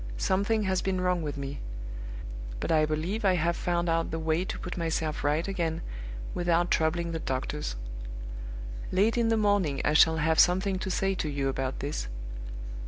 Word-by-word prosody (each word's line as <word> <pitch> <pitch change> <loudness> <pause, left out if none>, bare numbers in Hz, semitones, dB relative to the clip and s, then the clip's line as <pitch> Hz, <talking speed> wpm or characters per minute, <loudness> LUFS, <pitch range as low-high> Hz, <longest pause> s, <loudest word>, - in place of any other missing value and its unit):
"Something 200 - +2
has 190 -2 +1
been 190 -1 0
wrong 180 -1 +2
with 145 -2 -3
me. 140 0 -4 1.0
But - - -1
I 155 -1 +4
believe 165 +9 -1
I 190 -2 +5
have 170 0 +2
found 175 0 0
out 165 0 +1
the 165 - -2
way 160 +2 +1
to - - -4
put 180 - -5
myself 160 -2 -1
right 150 +4 +2
again 170 -4 -1 0.5
without 175 0 +2
troubling 170 +1 +2
the 165 - -2
doctors. 135 - -2 1.2
Late 205 +5 +3
in 235 -1 +3
the 225 0 +3
morning 205 -10 +2
I 150 - +3
shall 160 +1 +6
have 160 0 +2
something 190 +2 +4
to 190 - -3
say 195 +1 +1
to 165 -5 -2
you 140 -2 0
about 135 0 -2
this. 140 - -2
170 Hz, 175 wpm, -29 LUFS, 155-185 Hz, 1.2 s, shall